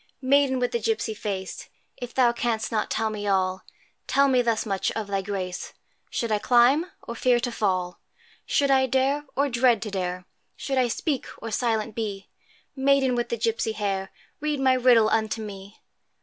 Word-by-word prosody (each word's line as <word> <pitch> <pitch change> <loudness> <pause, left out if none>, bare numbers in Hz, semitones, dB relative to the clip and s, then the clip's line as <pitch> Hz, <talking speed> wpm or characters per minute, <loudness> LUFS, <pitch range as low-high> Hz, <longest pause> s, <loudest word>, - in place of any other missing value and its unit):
Maiden 275 0 +3
with 250 -1 0
the 235 - 0
gipsy 225 0 -1
face, 195 -3 -5 0.3
If 245 -2 -7
thou 250 -2 +5
canst 235 -2 -2
not 215 -2 -1
tell 220 0 0
me 205 -1 -4
all, 190 -1 +1 0.5
Tell 280 0 +4
me 255 -2 +3
thus 230 -2 0
much, 195 -3 -1
of 220 - -3
thy 200 -1 -1
grace, 190 -2 -5 0.4
Should 230 -2 -2
I 210 - +2
climb, 250 - +4 0.2
or 235 - -6
fear 240 +1 +2
to 245 0 -2
fall? 185 -5 -1 0.5
Should 280 -1 +2
I 265 -1 +4
dare, 270 +3 +1
or 280 +2 +2
dread 240 -3 +3
to 210 - -5
dare? 180 -1 -3 0.3
Should 270 -2 -2
I 250 - +3
speak, 265 +4 -2
or 230 - -7
silent 220 -1 0
be? 200 -3 -5 0.5
Maiden 270 -1 +3
with 240 -1 -1
the 235 - -1
gipsy 225 -1 -1
hair, 195 -2 -2 0.3
Read 300 -1 -1
my 265 -1 +4
riddle 245 -3 +5
unto 220 0 0
me! 200 -1 -9
230 Hz, 180 wpm, -25 LUFS, 205-255 Hz, 0.5 s, thou